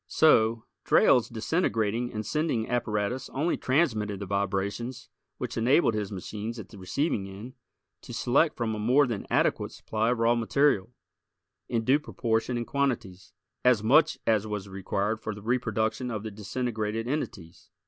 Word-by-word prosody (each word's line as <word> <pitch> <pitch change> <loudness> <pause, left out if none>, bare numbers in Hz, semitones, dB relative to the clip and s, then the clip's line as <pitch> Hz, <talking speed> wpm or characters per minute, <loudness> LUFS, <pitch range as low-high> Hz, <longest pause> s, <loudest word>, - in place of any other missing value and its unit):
So, 115 - +4 0.2
Drayle's 125 - +4
disintegrating 115 - 0
and 110 -2 -4
sending 150 -4 0
apparatus 120 0 -1
only 155 +6 +1
transmitted 110 - 0
the 100 - -4
vibrations 100 +5 -2 0.3
which - - -5
enabled 120 +3 +3
his 105 -2 -3
machines 105 +4 -5
at 110 - -8
the 105 - -12
receiving 95 - -1
end 105 +7 -9 0.5
to - - -11
select 150 +6 +2
from 115 -2 -1
a 110 - -4
more 125 +7 +4
than 115 -6 -4
adequate - - +1
supply 110 +1 -1
of 125 - +1
raw 115 +1 +3
material, 120 -2 +2 0.8
in 115 -1 0
due 135 +5 +4
proportion 120 -4 -1
and 120 - -2
quantities, 115 - -2 0.3
as 125 -4 +4
much 150 +7 +4
as 110 -1 +2
was 105 -2 -4
required 100 +3 -2
for 110 -1 -5
the 105 - -10
reproduction 115 0 -1
of 110 -3 -4
the 110 - -5
disintegrated 110 +1 -3
entities. 100 - -5
115 Hz, 155 wpm, -28 LUFS, 105-125 Hz, 0.8 s, So